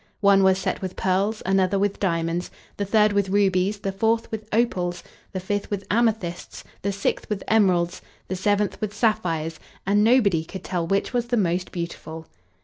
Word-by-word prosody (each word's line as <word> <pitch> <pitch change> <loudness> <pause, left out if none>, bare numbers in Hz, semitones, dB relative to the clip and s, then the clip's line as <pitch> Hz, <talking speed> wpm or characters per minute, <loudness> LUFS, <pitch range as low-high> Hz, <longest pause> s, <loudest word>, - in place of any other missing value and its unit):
One 200 -1 +5
was 190 -1 +4
set - - -2
with 185 -1 -5
pearls, 195 +4 0
another 190 +1 +2
with 200 0 0
diamonds, 170 -2 -1 0.3
the 200 - -1
third 210 +1 +3
with 200 -1 +1
rubies, 195 0 +2
the 195 - -2
fourth 225 +4 0
with 215 -1 -6
opals, 180 -6 0 0.3
the 190 - -3
fifth 200 +2 -3
with 200 -1 -3
amethysts, 215 -6 -1 0.2
the 200 - -1
sixth 200 +1 -2
with 210 -2 -2
emeralds, 185 -5 +2 0.3
the 185 - -3
seventh 205 +2 0
with 210 -1 -3
sapphires; 170 -8 0 0.3
and 205 +2 +3
nobody 215 -8 +4
could 190 +3 -9
tell 175 -3 -2
which 195 +6 0
was 240 -1 0
the 240 0 0
most 180 -2 0
beautiful. 165 -2 -6
195 Hz, 175 wpm, -24 LUFS, 180-210 Hz, 0.3 s, One